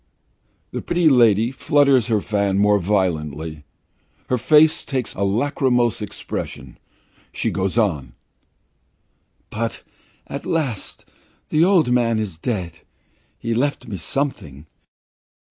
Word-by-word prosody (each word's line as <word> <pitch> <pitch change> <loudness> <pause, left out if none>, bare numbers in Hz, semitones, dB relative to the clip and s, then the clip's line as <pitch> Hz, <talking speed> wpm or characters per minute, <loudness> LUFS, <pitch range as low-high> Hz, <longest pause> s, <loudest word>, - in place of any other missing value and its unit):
The - - -4
pretty 170 -2 +2
lady 115 -3 +4
flutters 140 -3 +3
her 110 -3 +1
fan 100 -2 0
more 105 0 +4
violently. 80 -6 -2 0.6
Her 125 - +2
face 150 +5 +4
takes 130 -4 -3
a - - -6
lachrymose 120 +2 +1
expression. 105 -1 -6 0.5
She - - -2
goes 95 +3 -1
on: 75 - 0 1.4
"But 115 +1 -4 0.4
at - - -6
last 140 - -3 0.4
the 155 +1 +3
old 175 -8 +3
man 120 -2 +2 0.2
died. 90 -9 -3 0.6
He 115 0 -3
left 130 +1 -1
me 105 -4 -5
something. 80 - -4
115 Hz, 110 wpm, -21 LUFS, 95-135 Hz, 1.4 s, lady